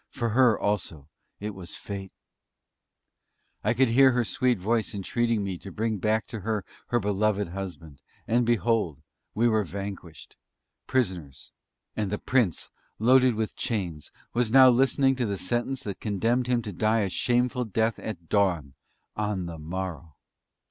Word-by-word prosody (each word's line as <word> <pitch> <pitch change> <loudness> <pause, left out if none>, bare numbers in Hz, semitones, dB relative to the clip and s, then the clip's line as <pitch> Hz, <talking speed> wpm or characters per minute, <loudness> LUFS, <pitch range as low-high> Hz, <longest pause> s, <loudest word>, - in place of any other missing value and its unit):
For 120 -2 -2
her 120 -1 +4
also 85 -8 -2 0.3
it 105 +1 -4
was 95 -3 -7
Fate! 100 -2 -8 1.4
I - - +2
could 130 0 +3
hear 130 +2 +6
her 120 -1 +1
sweet 125 +1 +1
voice 110 +3 -1
entreating 115 +2 0
me 95 -3 -4
to 95 - -9
bring 110 +2 -2
back 110 +3 +1
to 115 - -5
her 105 0 -2 0.2
her 120 - +1
beloved 105 -1 0
husband; 85 -6 -7 0.3
and 120 +2 +3
behold! 115 -8 +1 0.4
we 115 +2 +3
were 110 -2 +2
vanquished 95 -3 -8 0.5
prisoners 90 - -2 0.4
and 105 -3 -2
the 105 - 0
Prince, 115 - 0 0.3
loaded 125 +1 +5
with 110 0 -2
chains, 90 -10 -3 0.2
was 120 -1 +1
now 130 +1 +8
listening 135 +2 +3
to 125 -3 0
the 100 -1 -2
sentence 120 +8 -2
that 100 -6 -5
condemned 115 +4 0
him 120 -2 +1
to 105 - -5
die 110 +4 +1
a 100 - 0
shameful 125 +6 +1
death 110 0 0
at 85 -7 -6
dawn 90 -9 +1 0.4
on 105 -3 -2
the 85 -2 -7
morrow! 85 -1 -5
105 Hz, 155 wpm, -27 LUFS, 95-120 Hz, 1.4 s, now